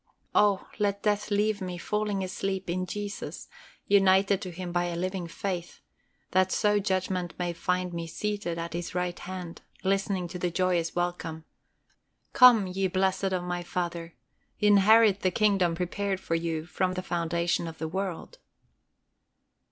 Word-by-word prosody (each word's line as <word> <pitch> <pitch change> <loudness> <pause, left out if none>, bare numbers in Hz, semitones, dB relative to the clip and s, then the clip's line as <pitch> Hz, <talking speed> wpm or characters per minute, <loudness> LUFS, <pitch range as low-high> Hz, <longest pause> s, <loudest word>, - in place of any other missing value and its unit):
Oh 205 -2 +3
let 200 -1 0
death 210 0 +1
leave 210 0 +1
me 180 -1 -4
falling 210 +2 -1
asleep 190 -1 -3
in 185 +1 -2
Jesus, 205 +2 -5 0.4
united 195 0 +4
to 185 - -5
Him 175 0 -6
by 175 0 +1
a 175 -1 -3
living 185 0 -3
faith, 175 0 -4 0.5
that 185 0 +3
so 210 0 +3
judgment 185 -3 -1
may 175 -1 -2
find 180 +1 -1
me 170 -1 -4
seated 205 -1 -3
at 170 0 -4
His 175 0 -4
right 180 -1 -2
hand, 180 -2 -7 0.2
listening 195 -1 0
to 180 - -6
the 180 - 0
joyous 175 -1 0
welcome, 175 -2 -3 0.9
"Come, 245 -5 +8
ye 190 +1 -1
blessed 190 +1 0
of 185 -2 0
my 175 0 -3
Father, 170 -1 -4 0.4
inherit 210 0 +6
the 185 - +2
kingdom 190 -4 +2
prepared 190 +2 -2
for 165 - -4
you 165 -1 -1
from 185 +1 -1
the 185 - -3
foundation 170 -1 -1
of 160 -1 -8
the 160 - -3
world." 190 - -4
185 Hz, 150 wpm, -28 LUFS, 175-195 Hz, 0.9 s, Come